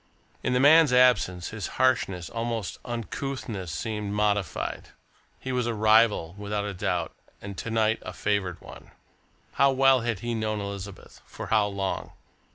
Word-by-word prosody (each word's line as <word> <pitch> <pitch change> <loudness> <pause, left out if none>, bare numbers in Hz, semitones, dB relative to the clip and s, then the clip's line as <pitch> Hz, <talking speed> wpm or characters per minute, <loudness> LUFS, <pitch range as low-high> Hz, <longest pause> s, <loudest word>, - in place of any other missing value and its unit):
In 125 - -1
the 125 - +3
man's 150 +1 +7
absence, 125 -8 +3
his 110 -3 -5
harshness, 105 -9 +1
almost 115 -3 -4
uncouthness, 115 - -5
seemed 105 +4 -3
modified. 105 -5 -1 0.5
He 130 - -5
was 125 -2 0
a 115 - -1
rival, 110 -5 +4
without 105 0 -3
a 100 - -4
doubt, 90 - -2 0.3
and 100 0 -8
to - - -5
night 110 -1 +1
a - - -7
favoured 95 -4 -1
one. - - -13 0.6
How 140 0 +4
well 135 -1 +4
had 115 -4 -2
he 120 0 -2
known 110 -1 -2
Elizabeth? 100 -1 -8
For - - -8
how 105 -2 +4
long? 100 -1 -3
110 Hz, 155 wpm, -26 LUFS, 100-120 Hz, 0.6 s, man's